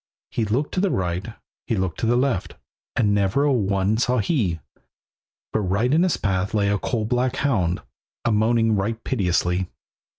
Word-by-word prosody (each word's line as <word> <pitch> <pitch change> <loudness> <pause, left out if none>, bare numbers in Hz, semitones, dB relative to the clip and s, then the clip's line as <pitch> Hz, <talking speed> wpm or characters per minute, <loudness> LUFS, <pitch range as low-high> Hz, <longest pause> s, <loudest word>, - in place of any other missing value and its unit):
He 115 - 0
looked 125 +8 -1
to - - 0
the 195 +1 +2
right, 90 - -1 0.4
he 115 - +1
looked 95 -5 -2
to 115 - 0
the 120 - +3
left, 125 -7 0 0.4
And 105 -4 +2
never 100 +7 +2
a 145 -1 +3
one 100 -2 +1
saw 125 +1 +1
he; 105 - 0 0.9
But - - +2
right 105 +6 +1
in 160 - +4
his 180 -2 +2
path 95 +1 -1
lay 100 -1 +2
a 100 0 +1
coal 110 +1 -1
black 125 +2 0
hound, 100 - 0 0.4
A 120 - +3
moaning 110 +1 +3
right 110 +3 -2
piteously. 90 -5 0
110 Hz, 175 wpm, -23 LUFS, 95-125 Hz, 0.9 s, in